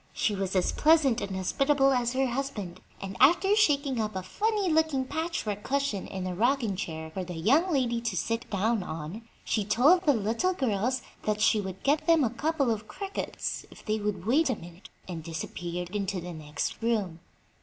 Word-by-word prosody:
She 210 Hz, -, 0 dB
was 195 Hz, -1 st, -2 dB
as 185 Hz, -, +2 dB
pleasant 300 Hz, -6 st, +4 dB
and 195 Hz, -1 st, -4 dB
hospitable 275 Hz, +8 st, +2 dB
as 245 Hz, -1 st, +1 dB
her 265 Hz, +1 st, +2 dB
husband, 240 Hz, -9 st, -4 dB, 0.2 s
and 195 Hz, 0 st, -6 dB
after 385 Hz, +6 st, +5 dB
shaking 285 Hz, -, +2 dB
up 215 Hz, -2 st, -3 dB
a 185 Hz, -, -3 dB
funny 415 Hz, -, 0 dB
looking 315 Hz, -5 st, +2 dB
patchwork 285 Hz, -, -3 dB
cushion 275 Hz, -5 st, -1 dB
in 190 Hz, -2 st, -5 dB
a 185 Hz, -, -2 dB
rocking 235 Hz, +1 st, +1 dB
chair 160 Hz, -4 st, -5 dB
for 190 Hz, +3 st, -4 dB
the 180 Hz, -1 st, -7 dB
young 275 Hz, -, +3 dB
lady 240 Hz, -5 st, +1 dB
to 225 Hz, -5 st, -2 dB
sit 230 Hz, +6 st, -2 dB
down 215 Hz, +2 st, +1 dB
on 160 Hz, +4 st, -6 dB, 0.2 s
she 215 Hz, -, 0 dB
told 260 Hz, -, +4 dB
the 290 Hz, -, +7 dB
little 230 Hz, -, 0 dB
girls 250 Hz, -, 0 dB, 0.2 s
that 210 Hz, -1 st, -1 dB
she 215 Hz, 0 st, +3 dB
would 190 Hz, -1 st, -7 dB
get 295 Hz, +4 st, +1 dB
them 330 Hz, -3 st, +5 dB
a 230 Hz, -, +1 dB
couple 280 Hz, +1 st, 0 dB
of 215 Hz, -1 st, -3 dB
crickets 395 Hz, 0 st, -4 dB
if -, -, -15 dB
they 215 Hz, 0 st, 0 dB
would 205 Hz, -3 st, -3 dB
wait 275 Hz, +7 st, +3 dB
a 255 Hz, -, +1 dB
minute, 175 Hz, +2 st, -13 dB, 0.2 s
and 170 Hz, -3 st, -5 dB
disappeared 175 Hz, +3 st, -5 dB
into 200 Hz, -2 st, -1 dB
the 175 Hz, 0 st, -7 dB
next 155 Hz, +4 st, -4 dB
room. 210 Hz, -8 st, 0 dB
225 Hz, 190 wpm, -28 LUFS, 190-275 Hz, 0.2 s, the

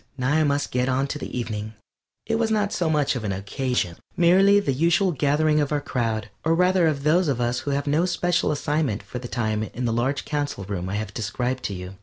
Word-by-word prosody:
Now 130 Hz, +1 st, 0 dB
I 155 Hz, 0 st, +3 dB
must 145 Hz, -1 st, 0 dB
get 125 Hz, +1 st, 0 dB
on 130 Hz, +1 st, +1 dB
to 150 Hz, -, -4 dB
the 125 Hz, -, -5 dB
evening. 110 Hz, -2 st, -4 dB, 0.5 s
It 225 Hz, 0 st, 0 dB
was 225 Hz, -1 st, +1 dB
not 210 Hz, -2 st, 0 dB, 0.2 s
much 150 Hz, -3 st, +1 dB
of 120 Hz, -, -4 dB
an 105 Hz, -, -1 dB
occasion, 100 Hz, -1 st, -2 dB, 0.2 s
merely 190 Hz, +4 st, +5 dB
the 145 Hz, -9 st, 0 dB
usual 170 Hz, +7 st, +2 dB
gathering 150 Hz, +1 st, +2 dB
of 145 Hz, -1 st, 0 dB
our 150 Hz, -, +1 dB
crowd, 115 Hz, -6 st, -2 dB
or 160 Hz, +1 st, +2 dB
rather 180 Hz, 0 st, +3 dB
of 140 Hz, -3 st, -1 dB
those 170 Hz, +4 st, +3 dB
of 135 Hz, -4 st, 0 dB
us 120 Hz, +1 st, 0 dB
who -, -, -5 dB
have 140 Hz, 0 st, 0 dB
no 150 Hz, +4 st, +2 dB
special 175 Hz, -1 st, +1 dB
assignment 145 Hz, -6 st, -1 dB
for 125 Hz, -, -7 dB
the 125 Hz, -, -7 dB
time 110 Hz, -3 st, -1 dB
in 120 Hz, +3 st, -4 dB
the 115 Hz, -, 0 dB
large 130 Hz, +5 st, -1 dB
Council 145 Hz, -9 st, -2 dB
Room 95 Hz, -2 st, -4 dB
I 100 Hz, -, -2 dB
have 105 Hz, -1 st, -4 dB
described 125 Hz, +3 st, -2 dB
to 100 Hz, -, -2 dB
you. 90 Hz, +1 st, -8 dB
140 Hz, 230 wpm, -24 LUFS, 115-155 Hz, 0.5 s, merely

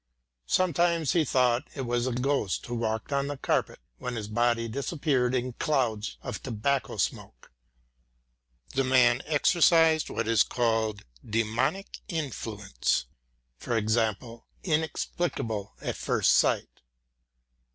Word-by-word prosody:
Sometimes 170 Hz, -3 st, +2 dB
he 170 Hz, -, +3 dB
thought 125 Hz, -1 st, +2 dB
it 140 Hz, -, -4 dB
was 120 Hz, +1 st, 0 dB
a -, -, 0 dB
ghost 125 Hz, -5 st, -1 dB
who 120 Hz, -, -6 dB
walked 110 Hz, +2 st, -2 dB
on 140 Hz, 0 st, 0 dB
the 145 Hz, -1 st, -4 dB
carpet -, -, 0 dB, 0.2 s
when 125 Hz, -1 st, -4 dB
his 105 Hz, -2 st, -4 dB
body 120 Hz, +1 st, +1 dB
disappeared 135 Hz, 0 st, 0 dB
in 125 Hz, 0 st, -1 dB
clouds 120 Hz, -8 st, -1 dB
of -, -, -5 dB
tobacco 130 Hz, +3 st, -1 dB
smoke. -, -, -3 dB, 1.2 s
The 135 Hz, -, +2 dB
man 130 Hz, -1 st, +4 dB
exercised 160 Hz, +1 st, +4 dB
what 115 Hz, -, -2 dB
is 115 Hz, -2 st, +4 dB
called 110 Hz, -3 st, 0 dB, 0.2 s
a -, -, -17 dB
"demonic" 115 Hz, -, -1 dB
influence, 110 Hz, -, -2 dB, 0.6 s
i.e. 115 Hz, 0 st, 0 dB, 0.2 s
inexplicable 150 Hz, -, -2 dB
at -, -, -3 dB
first -, -, +2 dB
sight. -, -, +1 dB
125 Hz, 120 wpm, -28 LUFS, 115-145 Hz, 1.2 s, man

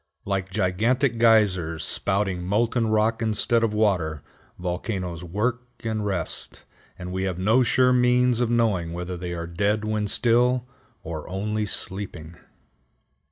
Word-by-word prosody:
Like 95 Hz, -1 st, -2 dB
gigantic 110 Hz, +7 st, +1 dB
geysers 95 Hz, -8 st, +3 dB
spouting 95 Hz, -2 st, 0 dB
molten 115 Hz, +5 st, +1 dB
rock 110 Hz, +1 st, +1 dB
instead 115 Hz, +1 st, +1 dB
of 115 Hz, -, +2 dB
water, 90 Hz, -8 st, 0 dB, 0.3 s
volcanoes 90 Hz, -1 st, -4 dB
work 115 Hz, +8 st, -2 dB
and 110 Hz, -2 st, -2 dB
rest, 95 Hz, -5 st, -4 dB, 0.3 s
and 90 Hz, 0 st, -7 dB
we 95 Hz, +1 st, -2 dB
have 90 Hz, -2 st, -2 dB
no 110 Hz, +7 st, +3 dB
sure 125 Hz, +1 st, +3 dB
means 125 Hz, -1 st, +3 dB
of 120 Hz, -2 st, +1 dB
knowing 105 Hz, -8 st, +1 dB
whether 90 Hz, +1 st, -4 dB
they 90 Hz, 0 st, -5 dB
are 85 Hz, 0 st, -4 dB
dead 100 Hz, +5 st, 0 dB
when 110 Hz, -1 st, -1 dB
still, 125 Hz, +3 st, +2 dB, 0.4 s
or 80 Hz, -1 st, -6 dB
only 105 Hz, +3 st, -2 dB
sleeping. 90 Hz, -5 st, -4 dB
105 Hz, 135 wpm, -24 LUFS, 90-115 Hz, 0.4 s, geysers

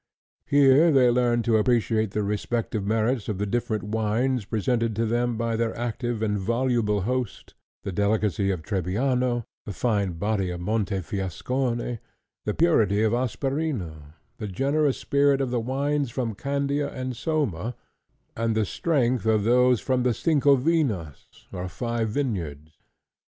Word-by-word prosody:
Here 145 Hz, +3 st, +5 dB
they 130 Hz, -4 st, +5 dB
learned 120 Hz, -1 st, +2 dB
to 115 Hz, -2 st, +3 dB
appreciate 110 Hz, -1 st, +2 dB
the 105 Hz, +2 st, -2 dB
respective 105 Hz, +1 st, -2 dB
merits 110 Hz, +3 st, 0 dB
of 105 Hz, -, -2 dB
the 105 Hz, -, -1 dB
different 110 Hz, 0 st, -1 dB
wines 110 Hz, +3 st, 0 dB
presented 115 Hz, +1 st, 0 dB
to 115 Hz, +2 st, 0 dB
them 120 Hz, +1 st, 0 dB
by 115 Hz, 0 st, -1 dB
their 115 Hz, 0 st, -1 dB
active 120 Hz, -1 st, -2 dB
and 105 Hz, -2 st, 0 dB
voluble 115 Hz, -1 st, +1 dB
host; 125 Hz, +1 st, -3 dB, 0.3 s
the 100 Hz, -, -3 dB
delicacy 100 Hz, +1 st, +1 dB
of 90 Hz, -5 st, -2 dB
Trebbiano, 120 Hz, -, 0 dB, 0.2 s
the 105 Hz, -, -4 dB
fine 100 Hz, -4 st, 0 dB
body 100 Hz, +1 st, -1 dB
of 90 Hz, -1 st, -4 dB
Montefiascone, 105 Hz, +5 st, -2 dB, 0.5 s
the 105 Hz, -, 0 dB
purity 110 Hz, -, +3 dB
of 110 Hz, 0 st, +2 dB
Asperino, 120 Hz, -, -2 dB, 0.2 s
the 105 Hz, -, -4 dB
generous 140 Hz, +7 st, +1 dB
spirit 140 Hz, -1 st, +2 dB
of 135 Hz, -3 st, -1 dB
the 125 Hz, -, +1 dB
wines 140 Hz, +3 st, -1 dB
from 115 Hz, -1 st, -2 dB
Candia 140 Hz, +4 st, -1 dB
and 130 Hz, -1 st, -4 dB
Soma, 125 Hz, -, -2 dB, 0.6 s
and 115 Hz, -1 st, 0 dB
the 110 Hz, -1 st, +2 dB
strength 125 Hz, -, 0 dB
of 110 Hz, -2 st, +3 dB
those 125 Hz, +1 st, +4 dB
from 130 Hz, +3 st, 0 dB
the 125 Hz, -2 st, +1 dB
Cincovinas, 140 Hz, -, +1 dB, 0.2 s
or 90 Hz, +1 st, -4 dB
Five 115 Hz, +3 st, -2 dB
Vineyards. 85 Hz, -, -3 dB
115 Hz, 140 wpm, -25 LUFS, 105-130 Hz, 0.6 s, Here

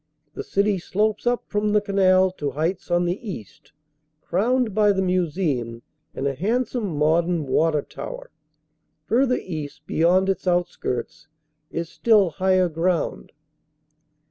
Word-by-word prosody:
The -, -, -5 dB
city 200 Hz, -1 st, +1 dB
slopes 210 Hz, +5 st, -1 dB
up 245 Hz, 0 st, +1 dB
from 210 Hz, 0 st, -1 dB
the 210 Hz, -, +5 dB
canal 190 Hz, -2 st, +3 dB
to 145 Hz, -6 st, -3 dB
heights 160 Hz, +8 st, -2 dB
on 175 Hz, 0 st, +2 dB
the 175 Hz, +2 st, -1 dB
east, 140 Hz, -, -9 dB, 0.5 s
crowned 230 Hz, +7 st, 0 dB
by 210 Hz, 0 st, +4 dB
the 190 Hz, -, 0 dB
museum 155 Hz, -10 st, -1 dB, 0.3 s
and 135 Hz, -, -3 dB
a 140 Hz, -, +1 dB
handsome 215 Hz, -, -1 dB
modern 165 Hz, +2 st, +2 dB
water 150 Hz, +2 st, +1 dB
tower. -, -, -8 dB, 0.7 s
Fur 255 Hz, +4 st, +2 dB
ther 250 Hz, -, +1 dB
east, 150 Hz, -4 st, -7 dB
beyond 180 Hz, +5 st, +2 dB
its 195 Hz, -1 st, -2 dB
outskirts, 165 Hz, -5 st, -2 dB, 0.4 s
is 165 Hz, 0 st, -4 dB
still 205 Hz, -1 st, +3 dB
higher 185 Hz, +1 st, +2 dB
ground. 170 Hz, +1 st, -1 dB
180 Hz, 135 wpm, -23 LUFS, 155-205 Hz, 0.7 s, the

